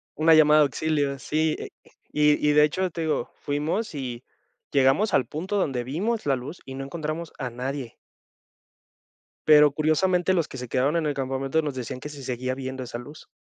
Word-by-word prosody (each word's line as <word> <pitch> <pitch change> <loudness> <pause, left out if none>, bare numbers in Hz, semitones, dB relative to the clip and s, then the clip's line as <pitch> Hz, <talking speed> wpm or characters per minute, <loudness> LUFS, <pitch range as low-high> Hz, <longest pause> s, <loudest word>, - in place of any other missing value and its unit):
Una 160 +1 +5
llamada 155 -1 +6
de - - +7
auxilio, 140 0 -1
sí, 155 +5 0 0.6
y 150 0 +3
y - - +4
de 150 0 +6
hecho 185 +5 +1
te 165 - -5
digo, 160 -1 -1
fuimos 155 +9 -2
y 125 -3 -5 0.5
llegamos 140 +10 +3
al 130 - +3
punto 185 +7 -3
donde 135 -9 0
vimos 200 - -2
la 135 -2 +2
luz 135 +7 -7
y 135 0 -8
no 135 - -5
encontramos 155 +2 -5
a 125 -3 -3
nadie. 125 +1 -5 1.5
Pero 150 -1 +7
curiosamente 180 +5 +2
los 165 -4 0
que 130 - -8
se 125 -1 -6
quedaron 135 +7 +1
en 160 - 0
el 145 - 0
campamento 135 +3 -1
nos 145 -3 -3
decían 125 0 -6
que 150 - -6
se 145 -2 -10
seguía 130 0 -3
viendo 130 0 -5
esa 120 -1 -6
luz. 145 +5 -11
145 Hz, 190 wpm, -25 LUFS, 130-155 Hz, 1.5 s, de